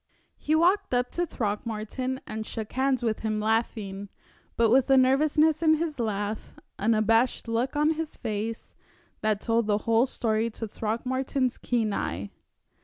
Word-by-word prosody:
He 310 Hz, -, +1 dB
walked 345 Hz, -3 st, +3 dB
up 245 Hz, 0 st, 0 dB
to 350 Hz, 0 st, -1 dB
Throckmorton 225 Hz, +3 st, -3 dB
and 220 Hz, 0 st, -5 dB
shook 220 Hz, -1 st, -6 dB
hands 260 Hz, -1 st, +1 dB
with 220 Hz, -2 st, 0 dB
him, 215 Hz, -1 st, -1 dB
laughing, 210 Hz, -3 st, -1 dB, 0.5 s
but 230 Hz, -1 st, +4 dB
with 260 Hz, +1 st, +4 dB
a 270 Hz, -, +6 dB
nervousness 300 Hz, +4 st, +3 dB
in 315 Hz, -1 st, +5 dB
his 310 Hz, -3 st, -3 dB
laugh, 210 Hz, -1 st, -3 dB, 0.2 s
an 220 Hz, +3 st, +2 dB
abashed 225 Hz, +3 st, +2 dB
look 235 Hz, +5 st, -1 dB
on 300 Hz, +2 st, +3 dB
his 320 Hz, -1 st, -4 dB
face, 220 Hz, 0 st, -4 dB, 0.5 s
that 215 Hz, -2 st, +1 dB
told 230 Hz, -1 st, +1 dB
the 205 Hz, -1 st, +3 dB
whole 230 Hz, +3 st, +3 dB
story 225 Hz, -2 st, 0 dB
to 225 Hz, 0 st, -6 dB
Throckmorton's 255 Hz, +4 st, -2 dB
keen 225 Hz, -4 st, 0 dB
eye. 100 Hz, -, -3 dB
230 Hz, 155 wpm, -27 LUFS, 215-265 Hz, 0.5 s, a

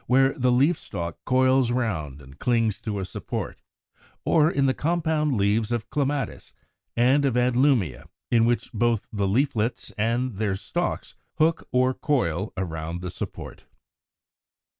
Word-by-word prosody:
where 135 Hz, +1 st, +4 dB
the 125 Hz, -1 st, +1 dB
leaf 140 Hz, +7 st, +3 dB
stalk 85 Hz, -1 st, -5 dB
coils 130 Hz, -1 st, +3 dB
round 80 Hz, -, -2 dB
and 65 Hz, +2 st, -15 dB
clings 115 Hz, -4 st, +1 dB
to 105 Hz, -2 st, -3 dB
a 95 Hz, -, -3 dB
support; -, -, -5 dB, 0.6 s
or 155 Hz, -1 st, +4 dB
in 140 Hz, -5 st, +1 dB
the 130 Hz, -, +3 dB
compound 155 Hz, -3 st, 0 dB
leaves 105 Hz, +3 st, +1 dB
of 120 Hz, -2 st, -3 dB
Clematis 145 Hz, -2 st, -2 dB, 0.4 s
and 130 Hz, +4 st, +4 dB
of 130 Hz, -3 st, +1 dB
Adlumia, 125 Hz, -, +2 dB, 0.2 s
in 115 Hz, -1 st, +5 dB
which 120 Hz, 0 st, 0 dB
both 115 Hz, -1 st, +1 dB
the 100 Hz, -2 st, 0 dB
leaflets 115 Hz, +1 st, 0 dB
and 115 Hz, +1 st, 0 dB
their 105 Hz, -2 st, 0 dB
stalks 175 Hz, -, -3 dB, 0.2 s
hook 165 Hz, +1 st, +2 dB
or 130 Hz, 0 st, +3 dB
coil 110 Hz, -, -1 dB
around 85 Hz, -1 st, -4 dB
the 90 Hz, -1 st, -5 dB
support. -, -, -7 dB
120 Hz, 140 wpm, -25 LUFS, 100-135 Hz, 0.6 s, in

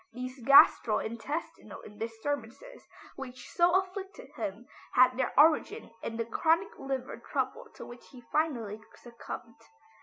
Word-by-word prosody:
These 255 Hz, +1 st, -7 dB
gastro 250 Hz, -4 st, +7 dB
intestinal 245 Hz, +9 st, -6 dB
disturbances 230 Hz, -, -6 dB, 0.3 s
which 255 Hz, -2 st, -9 dB
so 350 Hz, 0 st, +3 dB
afflicted 385 Hz, +5 st, -8 dB
him 210 Hz, +5 st, -5 dB, 0.3 s
had 255 Hz, 0 st, +5 dB
their 255 Hz, 0 st, -1 dB
origin 320 Hz, -, +3 dB
in 225 Hz, -, -5 dB
the 230 Hz, -, -1 dB
chronic 330 Hz, -, +1 dB
liver 270 Hz, -1 st, -4 dB
trouble -, -, -3 dB
to -, -, -9 dB
which 240 Hz, 0 st, -13 dB
he 255 Hz, -3 st, -13 dB
finally 235 Hz, -9 st, -1 dB
succumbed. 230 Hz, -1 st, -10 dB
255 Hz, 125 wpm, -30 LUFS, 230-320 Hz, 0.3 s, gastro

